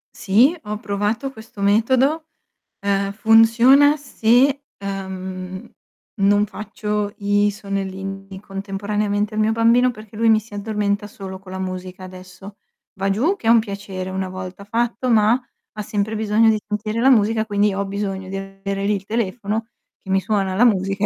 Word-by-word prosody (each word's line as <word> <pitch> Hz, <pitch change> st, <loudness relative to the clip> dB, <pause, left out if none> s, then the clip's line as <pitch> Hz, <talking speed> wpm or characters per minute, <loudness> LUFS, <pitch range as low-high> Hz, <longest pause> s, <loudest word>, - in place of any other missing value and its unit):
Sì, 245 Hz, -, +3 dB
ho 210 Hz, 0 st, -3 dB
provato 210 Hz, +6 st, -2 dB
questo 220 Hz, -3 st, -14 dB
metodo. 260 Hz, +10 st, +2 dB, 0.6 s
Uhm, 200 Hz, 0 st, 0 dB
funziona 230 Hz, +7 st, +6 dB
se, 275 Hz, 0 st, +2 dB, 0.2 s
uhm, 190 Hz, -1 st, -6 dB, 0.5 s
non 205 Hz, +1 st, +3 dB
faccio 210 Hz, 0 st, -4 dB
i 205 Hz, 0 st, +2 dB
sonnellini 195 Hz, -1 st, -5 dB
contemporaneamente 205 Hz, +1 st, -2 dB
al -, -, -1 dB
mio 215 Hz, +1 st, +3 dB
bambino, 230 Hz, +3 st, +4 dB
perché 215 Hz, -2 st, -13 dB
lui 230 Hz, 0 st, +3 dB
mi 220 Hz, -1 st, +5 dB
si 215 Hz, -1 st, -12 dB
addormenta 205 Hz, 0 st, -1 dB
solo 195 Hz, -3 st, -8 dB
con 185 Hz, 0 st, -13 dB
la 190 Hz, -, -5 dB
musica, 185 Hz, 0 st, -6 dB
adesso. 185 Hz, +2 st, -12 dB, 0.4 s
Va 195 Hz, 0 st, -1 dB
giù 280 Hz, -, +1 dB
che 310 Hz, -, -15 dB
è 225 Hz, -, +3 dB
un 230 Hz, -, +7 dB
piacere 200 Hz, -3 st, -5 dB
una 190 Hz, 0 st, -3 dB
volta 185 Hz, +1 st, -8 dB
fatto, 235 Hz, +4 st, -1 dB
ma 220 Hz, +2 st, +4 dB, 0.4 s
ha 210 Hz, -, -2 dB
sempre 205 Hz, +1 st, -2 dB
bisogno 220 Hz, +1 st, +3 dB
di 215 Hz, -1 st, +2 dB
sentire 215 Hz, +2 st, -2 dB
la 265 Hz, -, +5 dB
musica 220 Hz, -1 st, +3 dB
quindi 205 Hz, -1 st, +1 dB
ho 200 Hz, +1 st, -2 dB
bisogno 195 Hz, -1 st, -4 dB
di 195 Hz, -, -4 dB
avere 195 Hz, 0 st, -5 dB
lì 210 Hz, +1 st, +2 dB
il 195 Hz, -, -5 dB
telefono 220 Hz, +1 st, -2 dB, 0.3 s
che 190 Hz, -, -13 dB
mi 190 Hz, 0 st, +2 dB
suona 195 Hz, -2 st, -1 dB
la 220 Hz, -, +4 dB
musica 195 Hz, -3 st, +2 dB
205 Hz, 160 wpm, -21 LUFS, 195-225 Hz, 0.6 s, un